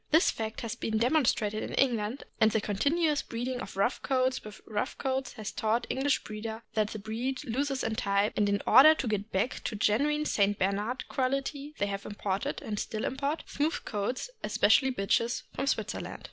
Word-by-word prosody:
This 320 +3 +5
fact 220 -1 -4
has 230 -1 -3
been 225 -2 -2
demonstrated 230 -4 +2
in - - -4
England, 235 -1 +1 0.2
and 220 - +6
the 220 - +1
continuous 290 - +1
breeding 245 +2 -4
of - - -8
rough 200 +6 +1
coats 260 -1 +1
with 210 -1 -10
rough 215 +5 -3
coats 265 -2 -2
has 215 -1 -5
taught 225 +2 0
English 270 +1 +1
breeders 220 +1 -6
that 215 -1 +2
the 215 - -6
breed 230 +5 -3
loses 270 +3 -1
in 225 - -1
type; 200 -1 +1
and 205 -1 +2
in 200 0 0
order 310 +4 +8
to 265 - -3
get 210 0 -2
back 195 +7 -1
to 225 - -2
genuine 290 +9 +2
St. 205 -6 +2
Bernard 205 +7 -1
quality 275 +3 -2
they 205 - +1
have 200 0 -4
imported, 200 -1 -3
and 210 -2 -3
still 215 -1 -3
import, 280 +4 -2
smooth 300 +3 -1
coats, 225 - -3
especially 265 - +4
bitches, 230 +1 0
from 275 - -2
Switzerland. - - -2
230 Hz, 185 wpm, -30 LUFS, 210-270 Hz, 0.2 s, order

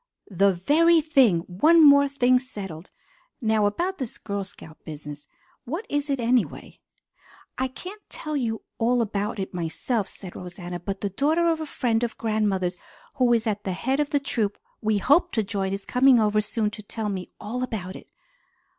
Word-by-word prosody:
"The 195 +2 +4
very 315 - +4
thing! 270 - +4
One 300 - +4
more 280 0 +7
thing 255 -2 +3
settled. 195 -10 -8 0.5
Now 220 -4 +2
about 355 - -2
this 255 -4 -4
Girl 200 -1 -4
Scout 160 -4 -13
business. 150 -1 -9 0.4
What 330 - -4
is 290 0 -1
it, 275 -2 0
anyway?" 240 0 0 0.8
"I 260 - +1
can't 365 +11 -10
tell 305 -1 -5
you 230 -5 -2 0.2
all 240 +1 +3
about 210 0 -3
it 190 -1 -4
myself," 180 +6 -2
said 185 -3 -10
Rosanna, 175 0 -7
"but 195 +3 -5
the 200 - -2
daughter 310 - +2
of 320 -1 -2
a 315 - -4
friend 235 -5 0
of 235 -2 -3
grandmother's 200 -5 0 0.4
who 250 -2 +3
is 230 -1 +2
at 210 -2 -1
the 190 - -2
head 260 +9 -1
of 295 -1 +1
the 285 - +2
troop 220 -7 -1 0.2
we 215 -1 +1
hope 305 - +3
to 220 - +1
join 195 -1 -2
is 195 0 -4
coming 255 0 +5
over 215 -1 +3
soon 215 0 -1
to 210 - -8
tell 210 +1 -4
me 185 -2 -4
all 240 +4 -4
about 200 -7 -4
it." - - -11
220 Hz, 180 wpm, -25 LUFS, 195-270 Hz, 0.8 s, more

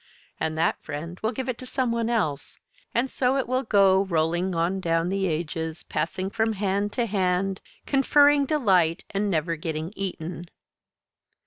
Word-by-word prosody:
And 160 0 -1
that 165 - +1
friend 165 +5 -6
will 220 - 0
give 260 +2 -4
it 250 -2 -3
to 255 - -7
some 255 -2 0
one 230 0 0
else, 160 -12 -1 0.3
and 240 +3 +1
so 260 0 +1
it 265 - -1
will 255 +1 +1
go 195 -4 +4
rolling 170 +1 0
on 170 +3 0
down 165 -1 0
the 195 0 0
ages, 160 0 -3
passing 185 +5 -3
from 220 +1 +1
hand 200 0 -1
to 240 - 0
hand, 190 -2 0 0.2
conferring 285 +1 +4
delight, 185 - +2
and 205 +1 0
never 165 -1 0
getting 160 +2 -4
eaten. 175 -3 -5
190 Hz, 160 wpm, -25 LUFS, 165-230 Hz, 0.3 s, go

